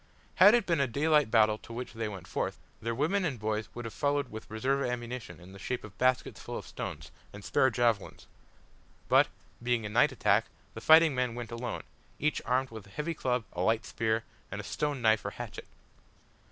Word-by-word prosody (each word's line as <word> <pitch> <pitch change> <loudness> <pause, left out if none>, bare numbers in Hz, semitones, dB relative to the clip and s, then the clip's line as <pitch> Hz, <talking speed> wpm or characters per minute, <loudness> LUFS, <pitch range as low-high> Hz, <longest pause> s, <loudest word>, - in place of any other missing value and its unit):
Had 205 +5 +9
it 235 -4 +2
been 170 -4 +1
a 140 - +3
daylight 150 +2 +3
battle 110 -1 +4
to - - -13
which 120 +2 -6
they 115 -1 -3
went 95 -4 -8
forth, - - -2 0.2
their 115 +1 -2
women 165 +10 +1
and 140 -9 -2
boys 110 0 -2
would 120 0 -6
have 115 - -6
followed 145 -2 0
with 110 0 -8
reserve 130 +6 0
ammunition 120 -2 -4
in 90 +2 -13
the 100 - -11
shape 125 - -3
of 105 -3 -11
baskets 130 0 +1
full - - -5
of - - -7
stones, - - -6 0.2
and 100 0 -10
spare 130 - +3
javelins; 115 -4 0 0.8
but, - - +6 0.3
being 120 -2 0
a - - -3
night 115 +3 +4
attack, - - +2 0.3
the - - -8
fighting 160 -1 +7
men 125 -2 -1
went 120 -2 -6
alone 115 0 -4 0.3
each 150 +1 0
armed 130 +1 +1
with 110 -3 -9
a - - -16
heavy 150 +9 -3
club, 125 -6 -1
a 90 - -3
light 110 +4 +2
spear, 110 0 0 0.3
and - - -5
a - - -5
stone 145 -4 -2
knife 110 -1 +4
or - - -2
hatchet. - - -8
120 Hz, 205 wpm, -30 LUFS, 110-140 Hz, 0.8 s, Had